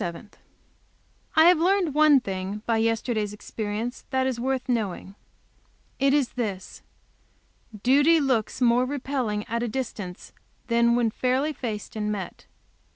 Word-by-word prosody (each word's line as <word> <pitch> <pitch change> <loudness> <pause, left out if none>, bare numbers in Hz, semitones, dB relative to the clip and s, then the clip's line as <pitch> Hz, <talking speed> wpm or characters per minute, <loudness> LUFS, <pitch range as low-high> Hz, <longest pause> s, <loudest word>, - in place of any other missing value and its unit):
I 315 - +7
have 350 -1 +6
learned 360 -2 +2
one 300 -2 +6
thing 195 +1 -5
by 230 -1 +1
yesterday's 225 -2 -1
experience 215 +3 -5
that 260 -1 +1
is 260 -3 -2
worth 260 +1 -2
knowing. 210 -6 -2 0.9
It 275 0 +3
is 280 -3 +2
this: 200 -6 -5 1.0
duty 290 +6 +5
looks 255 -4 0
more 245 +1 +4
repelling 255 -6 -2
at 235 0 -2
a 240 - -1
distance 215 -7 -6 0.3
than 235 -1 +3
when 235 -2 +1
fairly 260 +6 0
faced 225 -7 -6
and 210 -1 -2
met. 200 -3 -6
240 Hz, 130 wpm, -25 LUFS, 215-270 Hz, 1.0 s, I